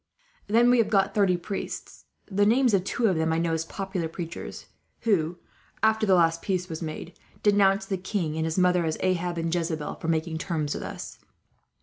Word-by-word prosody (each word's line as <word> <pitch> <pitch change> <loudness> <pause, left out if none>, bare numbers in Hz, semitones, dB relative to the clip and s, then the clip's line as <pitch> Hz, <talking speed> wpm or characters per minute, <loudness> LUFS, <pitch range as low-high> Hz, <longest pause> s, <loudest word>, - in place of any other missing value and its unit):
"Then 235 +3 +5
we 245 - +4
have 220 -2 +3
got 195 -2 +2
thirty 195 -4 +3
priests. 195 +3 -6 0.2
The 205 0 +1
names 240 +3 +4
of 190 -2 +3
two 230 +4 -1
of 190 -5 +3
them 160 0 +1
I 160 - +1
know 165 0 0
as 160 0 -1
popular 190 -2 -3
preachers 165 0 -7 0.4
who, 175 -7 +1 0.5
after 220 0 +3
the 190 - +6
last 165 -1 +3
peace 185 -2 -1
was 160 -2 -6
made, 165 +2 -6 0.3
denounced 195 -1 +3
the 190 - 0
king 180 -4 -2
and 160 - -1
his 160 +2 -2
mother 180 -1 +3
as 160 -1 -1
Ahab 175 -1 0
and 165 0 -1
Jezebel, 165 -3 -2
for - - -4
making 160 0 0
terms 155 -4 -2
with - - -5
us. - - -7
180 Hz, 200 wpm, -26 LUFS, 165-200 Hz, 0.5 s, the